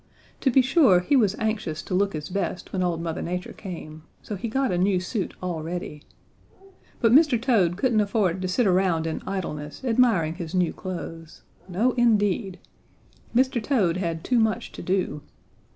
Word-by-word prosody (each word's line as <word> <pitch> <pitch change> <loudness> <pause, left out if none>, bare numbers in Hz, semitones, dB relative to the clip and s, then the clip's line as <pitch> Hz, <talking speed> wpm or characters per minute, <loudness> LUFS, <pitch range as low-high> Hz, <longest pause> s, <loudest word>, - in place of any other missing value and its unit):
To 270 - +2
be 260 +1 +5
sure 260 - +5
he 230 +11 +1
was 210 -6 +3
anxious 215 -8 -2
to - - -6
look 195 +2 +1
his 150 -1 -5
best 185 -1 -3
when 190 - -1
old 170 -2 -1
Mother 165 -1 -3
Nature 180 +1 -4
came, 160 -5 -8 0.2
so 210 - -5
he 200 +5 -4
got 265 +3 0
a 180 - 0
new 190 0 +2
suit 190 +1 -3
all 175 -3 -3
ready. 165 -2 -5 1.0
But 230 - +3
Mr. 285 -2 +5
Toad 210 -9 +2
couldn't 230 -2 +2
afford 200 -3 0
to 185 - -1
sit 220 +7 +1
around 180 -4 +2
in 160 - -3
idleness 150 - -5
admiring 225 -10 +3
his 170 -1 -6
new 180 -2 +1
clothes. 165 -3 -7 0.3
No 215 +8 +2
indeed! 205 -5 +1 0.8
Mr. 260 -1 +2
Toad 210 -9 +1
had 165 -3 -3
too 250 -2 +2
much 220 +1 0
to - - -9
do. 180 -6 -1
190 Hz, 175 wpm, -25 LUFS, 170-230 Hz, 1.0 s, be